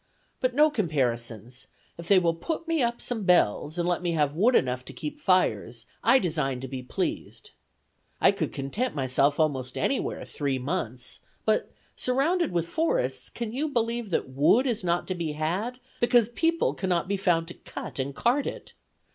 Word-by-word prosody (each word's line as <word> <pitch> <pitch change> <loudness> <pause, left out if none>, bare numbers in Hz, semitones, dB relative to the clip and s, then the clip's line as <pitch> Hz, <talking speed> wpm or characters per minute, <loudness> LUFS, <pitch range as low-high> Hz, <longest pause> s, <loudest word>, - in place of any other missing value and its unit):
But 255 -2 0
no 305 +2 +5
comparisons; 125 - -2 0.3
if 170 0 -9
they 200 - +6
will 170 -2 +3
put 320 - -4
me 330 -3 +1
up 235 -1 0
some 240 -3 -1
bells, 175 - +2
and 175 0 0
let 175 0 +1
me 175 -1 -1
have 150 -2 +1
wood 230 +9 +4
enough 125 0 +1
to - - -8
keep 150 - -6
fires, 185 -1 +1 0.2
I 265 - +6
design 150 - 0
to 135 - -5
be 130 0 -5
pleased. 125 - -4 0.7
I - - +6
could - - -3
content 195 - -3
myself 140 +2 +2
almost 130 -5 0
anywhere 275 - -1
three 140 -3 -2
months; 125 -3 -3 0.3
but, 215 0 +1 0.2
surrounded 300 +7 +1
with 170 -1 0
forests, 130 - -1
can 230 -2 -5
you 300 +5 -1
believe 235 -3 -1
that 170 - 0
wood 145 - +3
is 235 -7 -1
not 175 0 0
to 185 - -1
be 165 -4 -3
had, 185 +12 -2 0.2
because 240 -2 +4
people 330 +7 +1
cannot 180 -3 -1
be 200 - 0
found 175 -4 +1
to - - -7
cut - - -8
and 135 +1 -2
cart 255 +4 +1
it! - - -7
175 Hz, 180 wpm, -27 LUFS, -, 0.7 s, they